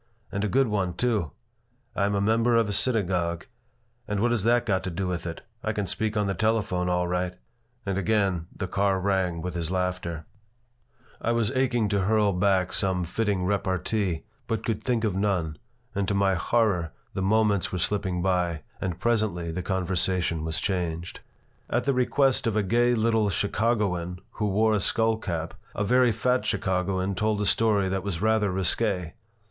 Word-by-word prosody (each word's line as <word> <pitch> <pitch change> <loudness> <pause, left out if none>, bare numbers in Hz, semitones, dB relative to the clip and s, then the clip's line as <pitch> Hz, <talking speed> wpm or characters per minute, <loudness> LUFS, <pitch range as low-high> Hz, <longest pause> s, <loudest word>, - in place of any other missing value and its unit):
"And 100 +1 -2
a - - +1
good 135 +6 +3
one, 95 -5 -1
too. 110 -7 0 0.7
I 100 - +2
am 100 - 0
a 100 - +1
member 115 +3 +3
of 115 -2 +3
a 100 - -2
synagogue. 90 -8 0 0.6
But 105 -1 -1
what 120 +3 +2
has 120 -4 +1
that 120 +1 +3
got 95 -4 +1
to - - -1
do 90 +2 -3
with 90 -1 -3
it? 80 - -6 0.2
I 110 - -1
can 105 -1 -1
speak 110 +3 -2
on 105 - +2
the 100 - 0
telephone, 100 -4 0
all 90 0 +1
right." 90 0 -1 0.5
And 95 -1 -1
again 95 -4 +1
the 95 - -4
car 100 0 +1
rang 95 -3 0
with 90 -1 -3
his 85 -2 -2
laughter 90 -3 -2 1.0
I 115 - +1
was 115 -1 +1
aching 125 -4 +1
to 100 -2 +1
hurl 105 -1 +3
back 95 -1 +2
some 95 -3 +1
fitting 100 +1 -1
repartee, 95 -2 -1 0.2
but 115 0 -2
could 115 -3 -2
think 120 -3 0
of 105 -4 +1
none, 90 -7 0 0.3
and 100 -1 -1
to 100 - 0
my 100 -1 +3
horror 90 -4 +1 0.2
the - - -2
moments 105 -1 +2
were 90 - -2
slipping 90 -1 -1
by, 90 -4 0 0.2
and 90 -3 -3
presently 105 -8 0
the 90 +3 -3
conversation 90 -2 0
was 80 0 -1
changed 90 -3 -2 0.5
At - - +1
the 140 - +1
request 130 0 +2
of 110 - 0
a 105 - +2
gay 120 +4 +3
little 110 -2 +2
Chicagoan 100 -4 0 0.2
who 105 - +1
wore 110 +2 +3
a 105 - +2
skull 110 +3 +2
cap 85 -6 -4 0.2
a 105 - 0
very 125 +3 +4
fat 125 +4 +1
Chicagoan 95 +1 0
told 105 +2 0
a 105 - 0
story 105 -3 +2
that 95 0 -1
was 95 -3 -3
rather 110 0 +2
risqué. 95 -1 0
100 Hz, 185 wpm, -26 LUFS, 90-110 Hz, 1.0 s, very